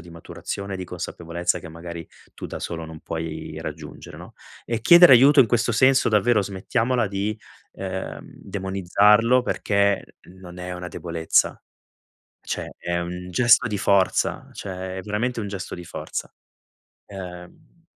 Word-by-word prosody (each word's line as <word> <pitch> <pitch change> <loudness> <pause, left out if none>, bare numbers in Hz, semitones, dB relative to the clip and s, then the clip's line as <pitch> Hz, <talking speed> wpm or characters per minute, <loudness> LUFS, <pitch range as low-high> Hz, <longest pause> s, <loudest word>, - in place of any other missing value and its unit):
di 85 +1 -13
maturazione, 95 +3 -6
di 95 - -5
consapevolezza 85 0 -3
che - - -10
magari 85 0 -8 0.3
tu - - -7
da - - -6
solo 85 -1 -5
non 80 -1 -10
puoi 80 -1 -5
raggiungere, - - -8
no, - - -11 0.3
e 115 -1 -2
chiedere 170 +3 +8
aiuto 135 +3 +7
in 120 - +6
questo 120 +1 +1
senso, 130 +2 +4
davvero, 110 0 +3
smettiamola 115 +5 -1
di, 100 +2 -3 0.3
ehm, - - -5
demonizzarlo 105 +5 +2
perché 100 -4 0 0.2
non 90 -1 -12
è 90 0 -5
una 90 0 -6
debolezza, 85 -2 0 0.8
cioè - - -5
è 85 0 -2
un 90 +1 -6
gesto 120 +4 +5
di 105 -2 -2
forza, 100 -1 +1
cioè 95 -1 -6
è - - -4
veramente 115 +4 -2
un 100 - -4
gesto 95 -2 -6
di 90 -1 -9
forza. - - -6 0.8
Ehm 90 - -11
95 Hz, 145 wpm, -23 LUFS, 90-115 Hz, 0.8 s, chiedere